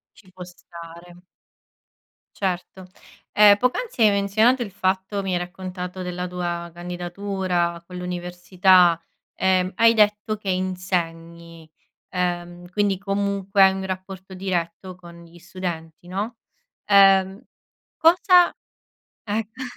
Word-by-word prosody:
Ci 190 -4 -20
può 180 -1 -9
stare. 170 0 -13 1.2
Certo. 185 -1 -4 0.5
Ehm, 205 -1 +7
poc'anzi, 250 - -1
hai 215 - +6
menzionato 215 +6 +2
il 215 - -5
fatto 190 +1 -2
mi 190 -1 -3
hai 180 - +1
raccontato 180 0 -7
della 180 0 -4
tua 175 -1 -4
candidatura 175 0 -3
con 180 - -10
l'università, 180 0 +2 0.3
ehm, 185 0 +1
hai 230 0 +5
detto 210 0 +2
che 205 -2 -4
insegni, 170 -3 -4 0.4
ehm, 175 -1 -3
quindi 200 0 0
comunque 200 0 0
hai 190 - +5
un 190 0 -5
rapporto 190 0 -7
diretto 185 -1 -4
con 170 -1 -14
gli 170 +1 -17
studenti, 175 -2 -7
no? 205 +6 -4 0.5
Ehm 195 -1 +4 0.5
cosa 355 +2 +5 0.7
ecco. 220 +3 -4
185 Hz, 110 wpm, -23 LUFS, 175-200 Hz, 1.2 s, Ehm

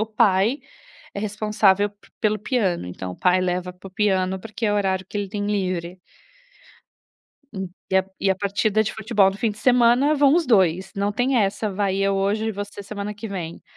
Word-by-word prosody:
o 220 - 0
pai 215 +4 +2 0.6
é - - -4
responsável 210 -1 +2 0.3
pelo 215 0 +1
piano, 200 - -1
então 90 +1 -6
o - - -13
pai 180 0 +3
leva 180 0 -2
para 180 +2 -12
o - - -19
piano, 190 -2 0
porque 225 +3 -6
é 205 - +2
o - - +1
horário 190 -2 0
que - - -6
ele 200 -1 -3
tem 205 +1 -3
livre. 185 -3 -2 1.9
E 190 - +3
a 190 - +3 0.2
e 195 - +2
a 190 - +3
partida 205 +2 +1
de 215 - -3
futebol 210 -3 +2
do 195 - -8
fim 230 -1 +1
de 210 - -9
semana 250 +4 +4
vão 285 0 +4
os 340 -2 +2
2, 190 -4 +2
não 200 +1 -1
tem 250 +4 +1
essa, 205 0 0
vai 195 -1 0
eu 195 0 +1
hoje 205 +3 0
e - - -2
você 205 0 -7
semana 205 +1 -5
que 210 +2 -7
vem, 175 -4 -6
200 Hz, 200 wpm, -23 LUFS, 190-215 Hz, 1.9 s, semana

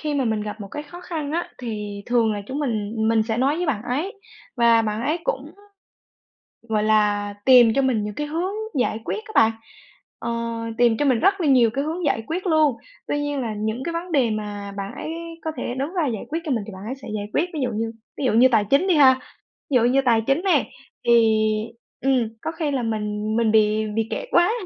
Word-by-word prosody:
khi 300 -1 -2
mà 275 -3 +1
mình 220 -2 0
gặp 210 +1 -6
một 200 - -7
cái 295 - -5
khó 345 +4 -11
khăn 315 -5 -4
á 340 +2 -1
thì 210 -4 -5
thường 235 -2 +2
là 205 -1 -4
chúng 265 +5 -4
mình 220 -7 -2
mình 225 -1 +3
sẽ 220 0 -2
nói 275 +5 +2
với 355 -1 -1
bạn 220 -8 -1
ấy. 320 +12 -3 0.4
Và 230 -1 +5
bạn 215 0 -2
ấy 305 +6 0
cũng, - - -2 1.2
gọi 215 -1 +1
là, 210 -1 +2
tìm 245 -4 +7
cho 275 - +2
mình 240 -6 +1
những 210 - -5
cái 295 - -3
hướng 335 +6 -2 0.3
giải 225 - 0
quyết 430 - -3
á 435 - -11
bạn, 225 0 +5 0.7
ờ, 235 - -4 0.5
tìm 235 -2 +4
cho 290 - +1
mình 255 -4 +3
rất 390 +3 +3
là 335 - +1
nhiều 250 -5 +5
cái 275 +5 -2
hướng 330 +3 -3
giải 225 -5 +1
quyết 360 +4 -3
luôn. 310 -6 +3 0.3
Tuy 290 - 0
nhiên 290 -1 -2
là 225 -4 -3
những 220 +4 -2
cái 335 - -3
vấn 340 +1 -5
đề 255 -6 +3
mà 205 -1 -4
bạn 200 0 -5
ấy 315 - -5 0.3
có 320 - -2
thể 245 0 -3
đứng 275 +6 -3
ra 340 -5 +1
giải 225 -5 -3
quyết 320 +3 -2
cho 310 - -4
mình 225 -5 -1
thì 215 - -8
bạn 190 +1 -9
ấy 240 +5 -4
sẽ 270 0 -12
giải 205 -1 -3
quyết. 320 - +2
Ví 300 - -2
dụ 250 - 0
như 225 +1 -2 0.3
ví 280 - -2
dụ - - +2
như 245 +4 +6
tài 220 -4 +3
chính 285 +8 +4
đi 370 - +3
ha, 270 -4 +7 0.6
ví - - +2
dụ 245 - +5
như 255 +3 +3
tài 230 -2 +4
chính 275 +5 +2
nè, 380 - +2 0.4
thì, 235 - +6 0.9
ừm, 255 -4 +2
có - - -3
khi 320 -3 -2
là 265 -3 -1
mình 215 -1 -2
mình 230 -2 +2
bị 215 0 +3
bị 225 0 0
kẹt - - -4
quá 345 +3 +4
245 Hz, 240 wpm, -23 LUFS, 220-295 Hz, 1.2 s, tìm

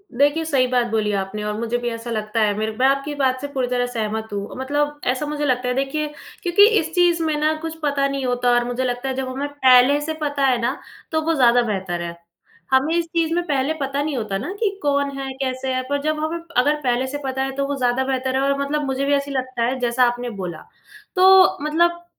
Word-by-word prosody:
देखिए, 290 +5 +3
सही 270 -5 +2
बात 250 -1 +1
बोली 215 -2 +1
आपने 195 +2 -5
और 210 0 -2
मुझे 235 +1 -1
भी 240 0 -2
ऐसा 230 0 -6
लगता 215 0 -1
है 210 -1 +3
मेरे 220 +1 -1
मैं 260 - +4
आपकी 275 +2 0
बात 260 -2 0
से 285 - -3
पूरी 260 -2 0
तरह 245 0 0
सहमत 220 -2 -3
हूँ। 200 0 -5
मतलब 290 +2 -1
ऐसा 255 +3 0
मुझे 295 0 -2
लगता 250 -2 0
है 250 - +1
देखिए 275 +3 -1 0.4
क्योंकि 375 +3 +6
इस 325 0 -4
चीज़ 350 -2 +3
में 310 -1 0
ना 305 +1 +2
कुछ 325 0 -5
पता 280 -1 +1
नहीं 275 -1 -3
होता 245 0 +1
और 240 0 +3
मुझे 245 +1 -2
लगता 250 +1 -2
है 260 - -2
जब 265 0 -3
हमें 270 +3 -3
पहले 265 -1 +5
से 315 +2 -3
पता 285 -2 0
है 255 -2 +3
ना, 245 +4 -1 0.3
तो 315 -1 +1
वो 325 +1 0
ज़्यादा 245 -4 +4
बेहतर 190 -6 -2
है। 170 0 -5 0.6
हमें 270 +5 +3
इस 340 -1 +1
चीज़ 330 -1 -1
में 350 +1 +1
पहले 280 +1 0
पता 275 +1 -1
नहीं 300 -1 -2
होता 215 -4 -2
ना 255 - -5
कि 430 -3 +1
कौन 280 -1 +1
है, 270 0 -4
कैसे 260 0 -2
है? 255 0 -1
पर 285 0 0
जब 310 +1 -1
हमें 315 +2 -2 0.2
अगर 285 +4 +4
पहले 255 -1 0
से 280 +2 -4
पता 265 0 -1
है 270 - -2
तो 275 0 -1
वो 285 - -2
ज़्यादा 250 0 +1
बेहतर 260 0 -1
है 265 - +2
और 275 0 +1
मतलब 290 +2 -1
मुझे 270 0 -1
भी 285 - +2
ऐसा 280 0 -2
लगता 255 -2 -3
है 255 +2 0
जैसा 245 0 +2
आपने 245 0 -2
बोला। 175 -3 -6 0.5
तो 375 0 +6
मतलब 345 +3 +1
265 Hz, 245 wpm, -21 LUFS, 245-295 Hz, 0.6 s, क्योंकि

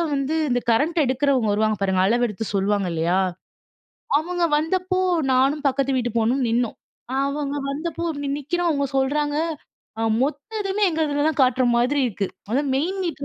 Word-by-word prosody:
வந்து 275 +3 -1
இந்த 245 -1 +2
கரண்ட் 305 +10 +1
எடுக்கிறவங்க 260 -3 +1
வருவாங்க 215 0 +1
பாருங்க! 190 -1 +2
அளவு 240 +3 +2
எடுத்து 225 +1 -5
சொல்லுவாங்க 200 0 +1
இல்லயா! 170 +3 +1 1.0
அவுங்க 350 +2 -1
வந்தப்போ 370 +4 -1 0.3
நானும் 275 +4 +2
பக்கத்து 270 0 0
வீட்டு 245 -1 0
பொண்ணும் 245 +4 +1
நின்னோம். 235 0 0 0.5
அவுங்க 280 0 -2
வந்தப்போ 335 +4 -4 0.2
நி 285 - -2
நிற்கிறோம். 345 +5 -1
அவுங்க 280 -2 0
சொல்றாங்க, 290 +2 0 0.6
ஆ - - 0 0.2
மொத்த 295 +11 -3
இதுமே 390 +1 -2
எங்க 320 -1 -2
இதில 290 0 0
தான் 315 - -1
காட்ற 255 0 +3
மாதிரி 255 +5 +2
இருக்கு. 195 -3 -3 0.2
முத 265 +5 +2
மெயின் 365 +8 -1
மீட்ர 295 -5 -4
275 Hz, 160 wpm, -23 LUFS, 240-305 Hz, 1.0 s, காட்ற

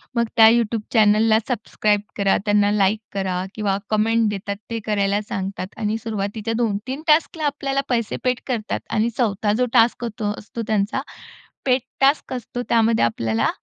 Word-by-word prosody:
मग 235 0 +2
त्या 220 0 +9
YouTube 230 -1 +1
चॅनेलला 220 0 +4
सबस्क्राईब 210 -3 0 0.2
करा, 200 -1 +3
त्यांना 205 -1 +3
लाइक 210 +1 +2
करा 185 -2 -2
किंवा 200 -3 0
कमेंट 225 +1 +2
देतात 200 0 -4
ते 230 -1 -3
करायला 205 -1 +1
सांगतात 190 -1 -4
आणि 215 +1 -1
सुरुवातीच्या 215 +1 -3
2-3 235 +4 -2
टास्कला 310 0 +2
आपल्याला 275 -1 -1
पैसे 235 -3 0
पेड 250 -1 +1
करतात 230 -4 -2
आणि 225 +2 +1
4था 210 -3 +1
जो 250 - +2
टास्क 235 +1 +3 0.2
असतो 210 +2 -4
त्यांचा, 215 +4 0 0.6
पेड 255 -1 +3 0.2
टास्क 275 0 +2
असतो. 245 0 -5
त्यामध्ये 225 - +3
आपल्याला 115 -1 0
220 Hz, 150 wpm, -22 LUFS, 205-235 Hz, 0.6 s, त्या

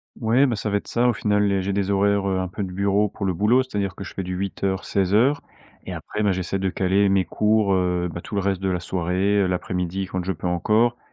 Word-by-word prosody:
Mouais, 120 +4 +3
bah, 120 - 0
ça 105 - -3
va 100 - +1
être - - -8
ça 120 +1 +1
au 120 - +3
final 105 -1 +1
et 95 -1 +1
j'ai 100 +1 -2
des 100 0 0
horaires, 100 0 +2
heu, 95 -1 0
un 95 - -2
peu 100 - -4
de 90 - -5
bureau 100 +2 +2
pour 100 - -5
le 95 - +1
boulot, 115 +8 +3
c'est-à-dire 100 -7 -3
que 100 - -7
je - - -9
fais 95 - -4
du 90 +1 -4
8:00-16:00 100 +6 0 0.4
et - - -5
après, 105 - -4
bah, 100 - +3
j'essaie 95 +1 -2
de 95 0 0
caler 95 +2 +2
mes 95 -1 +3
cours, 105 +2 +2
heu, 90 -1 0
bah, 85 - -6
tout 105 - -7
le 100 - +1
reste 95 -1 0
de 95 - 0
la 90 -1 0
soirée, 95 +3 0
heu, - - +1
l'après-midi 90 +1 -2
quand 95 -1 -3
je 95 - 0
peux 90 - -5
encore. 110 +7 +2
100 Hz, 260 wpm, -23 LUFS, 95-105 Hz, 0.4 s, Mouais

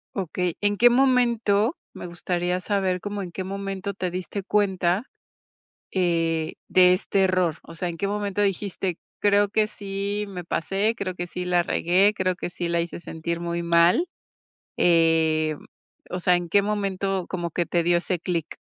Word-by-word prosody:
Okey, 180 -2 -2
¿en 205 0 +1
qué 245 +1 +7
momento?, 240 - +3 0.2
me - - -7
gustaría 175 +1 -2
saber 190 -2 0
como, 205 +1 -4
¿en 180 -2 -6
qué 185 - -4
momento 195 0 -4
te 185 -2 -3
diste 185 +3 -4
cuenta, 190 -1 +1 0.9
eh, 165 -3 0
de 180 -1 +6
este 195 +1 +1
error?, 185 -4 +1
o 165 - -12
sea, 175 +1 -3
¿en 165 - -8
qué 200 - -1
momento 205 -1 -2
dijiste: 195 -2 -1 0.2
"Creo 205 0 +4
que 215 +1 +2
sí 200 0 -4
me 180 -3 -7
pasé, 195 +6 0
creo 185 -4 -3
que 175 0 -4
sí 180 +1 -5
la 180 -1 +2
regué, 185 +5 +3
creo 185 -2 0
que - - -4
sí 175 -1 -4
la 170 0 +1
hice 170 +1 -5
sentir 170 0 -4
muy 170 0 -2
mal"?, 170 - +4 0.7
eh, 160 -2 +3
mm, - - -16 0.5
o 180 - -2
sea, 180 0 +4
¿en 175 -1 -4
qué 200 +3 +4
momento 195 -2 -1
como 175 -2 -3
que 170 +1 -1
te 175 - +1
dio 175 +1 +3
ese 180 0 -2
clic? 170 -2 -3
185 Hz, 175 wpm, -24 LUFS, 170-200 Hz, 0.9 s, qué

